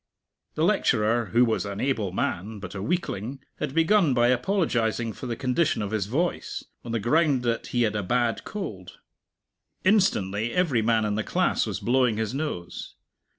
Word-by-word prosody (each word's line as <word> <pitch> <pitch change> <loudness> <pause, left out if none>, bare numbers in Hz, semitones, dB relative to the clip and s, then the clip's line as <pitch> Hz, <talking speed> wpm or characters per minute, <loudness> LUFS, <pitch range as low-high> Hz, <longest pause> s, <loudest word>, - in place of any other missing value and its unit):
The - - 0
lecturer, 115 +2 +2
who 120 +4 +3
was 110 -2 0
an 100 -1 -5
able 110 -8 0
man 100 +3 -2
but 95 -3 -8
a 95 - -5
weakling, 135 - -2 0.2
had 145 -3 -3
begun 165 -3 +4
by 120 0 +4
apologizing 120 - 0
for 130 - -7
the 120 - -2
condition 130 0 0
of 100 - -4
his 105 -3 -1
voice, 165 +10 -2 0.2
on 120 - -6
the 115 - 0
ground 140 +3 +2
that 115 -1 -1
he 120 -1 +1
had 110 -2 0
a 105 - 0
bad 120 +3 0
cold. 110 - -7 0.9
Instantly 120 - +2
every 165 -11 +2
man 110 0 +2
in 105 - 0
the 105 +1 -1
class - - +1
was - - -3
blowing 125 -2 +2
his 110 +1 -2
nose. 135 - -5
120 Hz, 175 wpm, -26 LUFS, 105-140 Hz, 0.9 s, begun